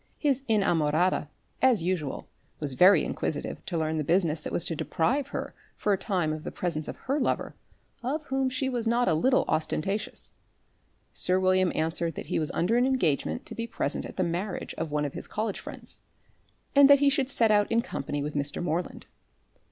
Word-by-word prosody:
His 275 Hz, -3 st, +1 dB
inamorata, 175 Hz, -5 st, +2 dB, 0.3 s
as 250 Hz, -9 st, +4 dB
usual, 170 Hz, -6 st, -2 dB, 0.3 s
was 145 Hz, -3 st, -1 dB
very 180 Hz, +4 st, +6 dB
inquisitive 145 Hz, -, -3 dB
to 175 Hz, -, -2 dB
learn 160 Hz, 0 st, 0 dB
the -, -, 0 dB
business 165 Hz, 0 st, +1 dB
that -, -, -6 dB
was 170 Hz, -, 0 dB
to 165 Hz, -, -1 dB
deprive 245 Hz, -, 0 dB
her -, -, -5 dB, 0.2 s
for 205 Hz, -, +1 dB
a -, -, +4 dB
time 180 Hz, -7 st, 0 dB
of 155 Hz, 0 st, -6 dB
the -, -, -4 dB
presence 160 Hz, -4 st, -2 dB
of -, -, -6 dB
a 265 Hz, -, +1 dB
lover, 255 Hz, -, -1 dB, 0.5 s
of 290 Hz, +5 st, -2 dB
whom 270 Hz, -1 st, 0 dB
she 255 Hz, +1 st, -1 dB
was 240 Hz, -3 st, -1 dB
not 240 Hz, +2 st, +2 dB
a -, -, +4 dB
little 255 Hz, +12 st, +3 dB
ostentatious. 195 Hz, +6 st, -1 dB, 0.8 s
Sir 185 Hz, +1 st, +3 dB
William 185 Hz, -1 st, +3 dB
answered 165 Hz, +1 st, -1 dB
that -, -, -6 dB
he -, -, +2 dB
was 155 Hz, -, 0 dB
under 200 Hz, +8 st, +1 dB
an 250 Hz, +1 st, +3 dB
engagement 245 Hz, -, 0 dB
to -, -, -7 dB
be 230 Hz, 0 st, -4 dB
present -, -, -2 dB
at -, -, -8 dB
the 185 Hz, -, +2 dB
marriage 180 Hz, +3 st, -3 dB
of 165 Hz, -1 st, -4 dB
one 150 Hz, 0 st, 0 dB
of 140 Hz, -, -4 dB
his -, -, -6 dB
college 215 Hz, -1 st, -3 dB
friends, -, -, -6 dB, 0.8 s
and 280 Hz, 0 st, +8 dB
that 285 Hz, -, +9 dB
he 285 Hz, 0 st, +4 dB
should 275 Hz, -2 st, +1 dB
set 230 Hz, -5 st, +3 dB
out 205 Hz, 0 st, +3 dB
in 230 Hz, +1 st, +3 dB
company 145 Hz, -, -3 dB
with 150 Hz, +1 st, -4 dB
Mr. 145 Hz, 0 st, -2 dB
Moreland. 175 Hz, +1 st, -3 dB
185 Hz, 200 wpm, -28 LUFS, 160-240 Hz, 0.8 s, that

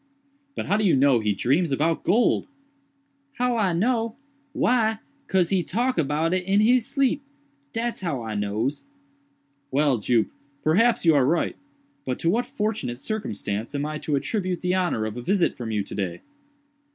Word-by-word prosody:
"But -, -, -3 dB
how 205 Hz, -, +2 dB
do 215 Hz, -, 0 dB
you 185 Hz, -7 st, +4 dB
know 135 Hz, -2 st, +4 dB
he 105 Hz, -2 st, 0 dB
dreams 145 Hz, -, +1 dB
about 160 Hz, +4 st, +1 dB
gold?" 225 Hz, +7 st, +2 dB, 0.9 s
"How 250 Hz, -2 st, 0 dB
I 205 Hz, -5 st, +2 dB
know? 225 Hz, +5 st, 0 dB, 0.4 s
why 225 Hz, -4 st, +2 dB, 0.3 s
'cause 185 Hz, -3 st, +2 dB
he 190 Hz, -2 st, +2 dB
talk 240 Hz, +6 st, 0 dB
about 155 Hz, +3 st, +1 dB
it 185 Hz, -1 st, 0 dB
in 195 Hz, +2 st, +2 dB
he 240 Hz, +4 st, +5 dB
sleep—dat's 275 Hz, -2 st, -3 dB
how 150 Hz, -10 st, -2 dB
I 110 Hz, -1 st, -4 dB
nose." 105 Hz, +7 st, -2 dB, 0.8 s
"Well, 140 Hz, -2 st, +2 dB
Jup, 115 Hz, +1 st, +2 dB, 0.4 s
perhaps 205 Hz, +8 st, +3 dB
you 165 Hz, -, +6 dB
are 140 Hz, -3 st, +4 dB
right; 160 Hz, +6 st, +1 dB, 0.5 s
but 130 Hz, -1 st, -2 dB
to 165 Hz, -, +1 dB
what 240 Hz, +4 st, 0 dB
fortunate 215 Hz, -, -3 dB
circumstance 115 Hz, -, -4 dB
am 145 Hz, +1 st, -1 dB
I 155 Hz, 0 st, -4 dB
to 150 Hz, -, -1 dB
attribute 185 Hz, +4 st, -2 dB
the 180 Hz, 0 st, 0 dB
honor 180 Hz, -12 st, 0 dB
of 110 Hz, +2 st, -5 dB
a -, -, -4 dB
visit 185 Hz, +8 st, +1 dB
from 120 Hz, -2 st, -6 dB
you 105 Hz, -2 st, 0 dB
to -, -, -9 dB
day?" 90 Hz, -4 st, -3 dB
175 Hz, 170 wpm, -25 LUFS, -, 0.9 s, you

